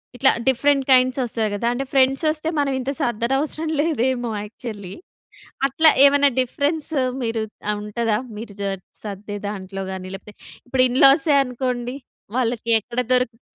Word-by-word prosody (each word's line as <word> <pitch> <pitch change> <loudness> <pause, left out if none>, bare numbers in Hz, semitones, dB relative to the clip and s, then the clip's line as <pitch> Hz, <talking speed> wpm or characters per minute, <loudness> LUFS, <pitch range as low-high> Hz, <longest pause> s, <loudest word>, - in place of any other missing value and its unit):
ఇట్లా 265 +2 +4 0.2
different 275 +1 +3
kinds 255 0 +4
వస్తాయి 225 -3 -1
గదా! 220 +3 -1
అంటే 270 +3 -3
ఫ్రెండ్స్ 270 +2 +3
వస్తే 310 0 -3
మనం 285 -1 +1
ఇంత 260 +2 -2
సర్దనవసరం 270 +7 -1
లేదేమో 260 -6 0
యాక్చువల్లీ. 210 -3 -8 0.8
అట్లా 315 +4 +5
ఏవన్నా 285 0 +6
డిఫరెన్స్ 285 +5 -1 0.3
మీరు 225 -1 -1 0.3
ఆ! - - +3
ఉంటదా? 210 +1 -1 0.2
మీరు 215 -1 -8
జర్ 195 -1 -2 0.2
సర్దే 205 0 -6
దాంట్లో 195 -1 -6
గాని 185 -1 -6
లేకపోతే 210 +2 -10 0.3
ఇప్పుడు 255 0 +2
ఇన్‌లాసే 275 +4 +5
అనుకోండి. 250 0 -3 0.4
వాళ్ళకి 235 -2 -1
ఎక్కడ 235 +3 -4
దొరికితే 250 -2 +1
250 Hz, 135 wpm, -22 LUFS, 215-275 Hz, 0.8 s, ఏవన్నా